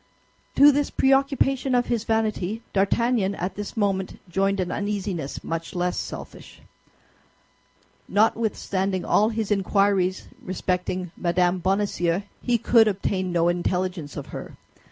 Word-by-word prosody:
To 285 +2 +8
this 285 0 0
preoccupation 270 -1 +2
of 245 0 +2
his 230 -2 -1
vanity, 220 -1 -1
D'Artagnan 200 +1 +1
at 180 +2 -3
this 205 +2 -7
moment 195 -3 -1
joined 195 +3 0
an 180 -1 -1
uneasiness 200 -7 -3
much 165 +2 -4
less 180 0 0
selfish. - - -7 1.5
Notwithstanding 200 -4 0
all 215 +2 +3
his 220 -2 -3
inquiries 195 -1 +1 0.2
respecting 180 -1 -2
Mme. 175 +1 +1
Bonacieux, 190 -1 0 0.2
he 245 -1 +1
could 230 0 +4
obtain 190 -2 -1
no 170 -1 +2
intelligence 175 -3 -1
of - - -5
her. - - -8
195 Hz, 120 wpm, -24 LUFS, 180-220 Hz, 1.5 s, To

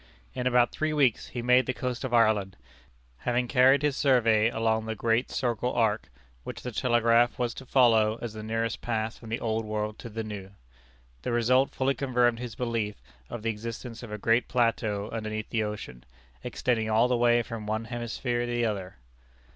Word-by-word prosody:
In 125 - -2
about 125 -1 +3
three 155 0 -1
weeks 135 -7 +2
he 120 - -5
made 125 +1 +4
the 130 - -1
coast 125 0 -3
of 130 - -3
Ireland, 110 -5 +2 0.6
having 125 - -1
carried 130 +2 +5
his 145 -2 +1
survey 115 -6 +3
along 110 -1 0
the 110 - -2
great 115 +3 +1
circle 125 -1 -1
arc, 110 - +1 0.3
which - - -7
the 125 - -4
telegraph 120 +1 +3
was 120 -2 -1
to 135 - -10
follow 115 -4 +4
as 120 -3 -5
the 110 - -7
nearest 115 +1 -2
path 110 -1 -2
from 115 - -11
the 115 +3 -2
old 110 -2 -1
world 105 0 -3
to 115 - -8
the 110 +1 -4
new. 105 -3 -7 0.7
The - - -3
result 125 +3 +3
fully 135 +1 +1
confirmed 125 -4 +1
his 120 -2 -6
belief 115 -4 -2 0.3
of 115 - -6
the 115 - +1
existence 115 +2 -7
of 120 -3 -9
a 105 - -4
great 115 +3 +2
plateau 110 -4 0
underneath 110 -1 -4
the 115 - +1
ocean, 105 - -5 0.4
extending 115 -3 -1
all 110 +3 +4
the 125 - +1
way 120 0 +3
from 110 -2 -7
one 110 +1 -2
hemisphere 120 +1 -3
to - - -3
the 120 0 +1
other. 100 -4 -3
115 Hz, 190 wpm, -28 LUFS, 110-125 Hz, 0.7 s, carried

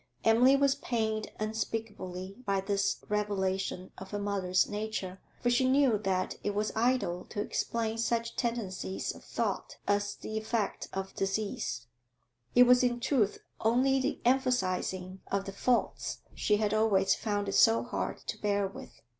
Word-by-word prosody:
Emily 245 +4 +6
was 275 0 +4
pained 220 -5 -2
unspeakably 210 -4 -4
by 200 -4 +1
this 200 +1 0
revelation 190 -3 -1
of 190 0 -9
her 205 - -3
mother's 195 -3 +1
nature, 205 -3 -4 0.2
for 245 - +3
she 255 +2 +3
knew 265 -5 +4
that 190 -2 -1
it 205 -1 -1
was 210 +1 0
idle 225 -7 +1
to - - -6
explain 225 +1 -1
such 230 0 0
tendencies 220 -6 -2
of - - -14
thought - - -3
as 205 0 +1
the 220 0 -4
effect 220 -1 -2
of 190 0 -4
disease; 195 - -2 0.7
it 245 - +9
was, 250 0 +6
in 240 -1 +1
truth, 230 -5 +1 0.2
only 255 +4 +3
the 270 +3 -1
emphasising 190 -7 0
of 195 0 0
the 195 - -5
faults 245 +4 0
she 210 - +2
had 210 -1 0
always 200 -3 +3
found 205 -2 -2
it 195 - -2
so 225 0 +5
hard - - -3
to - - -5
bear 205 -1 +1
with. 190 - -11
210 Hz, 155 wpm, -31 LUFS, 195-235 Hz, 0.7 s, it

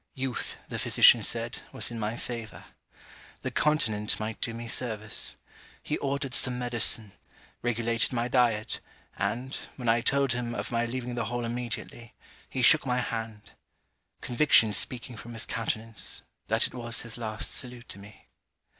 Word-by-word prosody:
Youth, 130 -2 -3
the - - -4
physician - - +7
said, - - -2
was - - -1
in 115 - -5
my 110 +2 -2
favour. 115 -3 -6 0.8
The - - -2
continent 110 -9 +2
might 110 +1 -4
do 115 - 0
me 115 +1 -6
service. 110 -3 +2 0.5
He - - -2
ordered 140 -1 -2
some 125 0 +4
medicine; 120 -3 0 0.5
regulated 115 -1 +1
my 120 -1 0
diet; 120 -3 +2 0.4
and, 130 +3 -1 0.2
when 125 -3 -6
I 115 +1 +4
told 140 +1 +2
him 120 -1 -2
of - - -3
my 120 0 +1
leaving 125 0 -4
the 120 -2 -1
Hall 120 +2 -2
immediately, 120 -1 -5 0.3
he 130 - -2
shook 155 +6 +7
my 125 -2 0
hand: 110 -3 -4 0.7
Conviction 120 -4 +5
speaking 120 +2 -1
from 120 +3 -9
his 115 - -1
countenance, 115 -1 -2 0.2
that - - +4
it - - -4
was 120 -1 -1
his 115 0 -6
last 110 -2 -3
salute 125 -2 -4
to 100 - -6
me. 100 +1 -14
120 Hz, 155 wpm, -28 LUFS, 115-125 Hz, 0.8 s, physician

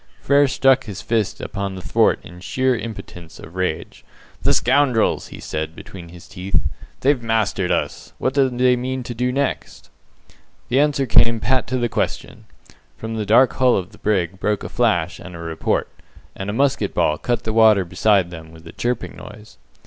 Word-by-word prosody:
Frere 140 +1 +4
struck 135 0 +3
his 100 -4 -7
fist 110 -3 -1
upon 100 -1 -4
the 95 - -7
thwart - - +2
in 90 +1 -12
sheer 130 +7 0
impotence 90 -8 -8
of 80 - -12
rage. 95 0 -3 0.4
"The - - +2
scoundrels!" 130 -3 +2
he - - -11
said, 80 +1 -4
between 85 -3 -10
his 85 0 -13
teeth, 95 0 -2 0.4
"they've 135 -1 +2
mastered 110 -5 0
us. - - -2
What 130 - -1
do 135 -1 +3
they 125 0 +3
mean 130 +1 -3
to 120 - -6
do 125 +2 -1
next?" 140 +1 -3 0.8
The 130 +3 +3
answer 145 -2 +2
came 115 -1 +4
pat 130 +2 +1
to 130 - -1
the 120 -1 +1
question. - - -3 0.5
From 110 0 -6
the 105 -2 -3
dark 125 +5 +5
hull 130 -1 +3
of 95 -2 -4
the - - -17
brig 95 -3 0
broke 105 -1 -1
a - - -5
flash 90 -8 0
and 90 -2 -10
a - - -7
report, 80 -1 -1 0.5
and 95 +1 -5
a - - 0
musket 135 +3 0
ball 75 0 +1
cut 120 -1 -1
the 110 - -2
water 110 -4 +5
beside 95 +1 +2
them 80 -1 -10
with 80 0 -15
a 80 - -9
chirping 120 -1 -3
noise. 105 +1 -13
110 Hz, 185 wpm, -21 LUFS, 95-125 Hz, 0.8 s, dark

